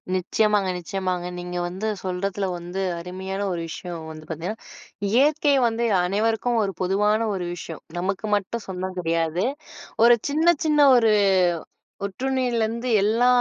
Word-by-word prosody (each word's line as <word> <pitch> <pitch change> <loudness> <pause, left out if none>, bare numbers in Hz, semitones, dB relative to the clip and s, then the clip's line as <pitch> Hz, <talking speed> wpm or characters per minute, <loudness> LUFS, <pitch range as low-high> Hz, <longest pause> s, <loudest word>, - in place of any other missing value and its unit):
நிச்சயமாங்க 205 +1 +1
நிச்சயமாங்க. 180 0 -3
நீங்க 180 0 -5
வந்து 190 +5 -4 0.2
சொல்றதுல 195 +2 -2
வந்து 175 +2 -5 0.2
அருமையான 190 +3 -5
ஒரு 170 -2 -2
விஷயம் 165 -1 -7
வந்து 155 0 -10
பார்த்தீங்கன்னா, 170 +7 -4 0.5
இயற்கை 285 +5 +3
வந்து 230 +1 -2 0.2
அனைவருக்கும் 225 +5 +1
ஒரு 195 -1 -1
பொதுவான 210 +4 +2
ஒரு 180 -2 -3
விஷயம். 170 -2 -8 0.2
நமக்கு 195 +3 -2
மட்டும் 205 +3 -4
சொந்தம் 185 0 -4
கிடையாது. 165 0 0 0.6
ஒரு 240 0 +8
சின்ன 310 +3 +1 0.2
சின்ன 300 -1 +2 0.2
ஒரு 225 -3 +4 0.9
ஒட்டுண்ணியிலருந்து 240 +1 -1
எல்லா 225 +4 +3
195 Hz, 125 wpm, -24 LUFS, 180-225 Hz, 0.9 s, ஒரு